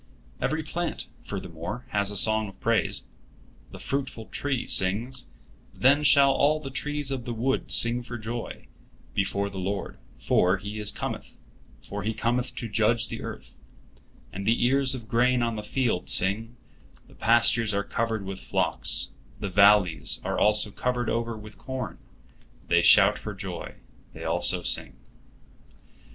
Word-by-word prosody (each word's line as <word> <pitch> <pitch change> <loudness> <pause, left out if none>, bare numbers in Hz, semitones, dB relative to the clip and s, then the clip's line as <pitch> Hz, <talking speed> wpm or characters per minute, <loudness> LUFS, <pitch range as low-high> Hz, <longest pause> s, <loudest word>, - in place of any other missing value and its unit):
Every 155 +1 -1
plant, 170 +3 -4 0.2
furthermore, 95 +3 -6
has 100 -1 0
a 105 - -2
song 110 +1 +4
of 95 -1 -13
praise. 115 -1 +1 0.7
The - - -11
fruitful 135 -5 -4
tree 140 -4 -2
sings, 115 +7 +1 0.5
"Then 140 +3 +4
shall 140 -2 +6
all 145 +3 +2
the 135 -3 -8
trees 145 0 -3
of 130 -3 -4
the 120 -2 -4
wood 130 +4 -1
sing 120 +1 +5
for 120 0 -7
joy, 115 +1 -6 0.5
before 100 +1 -1
the 100 -1 -7
Lord, 95 +1 -4 0.2
for 90 +2 +2
He 105 +2 -6
cometh; - - -6 0.5
for 100 +1 -6
He 110 +3 -2
cometh 120 +2 -1
to 120 - -4
judge 110 +2 +1
the - - -6
earth"; - - -8 0.8
and 100 +2 -5
the 120 +1 +3
ears 135 +1 +2
of 115 -4 -9
grain 120 +2 +2
on 115 -1 -1
the 105 - -4
field 115 -3 -1
sing, 110 +5 +1 0.5
"The - - -19
pastures 115 -1 +3
are 100 0 0
covered 110 -1 -2
with 95 0 -6
flocks; - - +1 0.3
the 100 - -3
valleys 100 -3 +4
also 105 0 +2
are - - -24
covered 125 -1 -1
over 115 -1 -2
with 110 0 -12
corn; 130 -9 -6 0.7
they - - +4
shout - - +6
for - - -6
joy, - - -7 0.4
they - - -9
also - - +2
sing." - - +2
115 Hz, 150 wpm, -26 LUFS, 100-125 Hz, 0.8 s, shall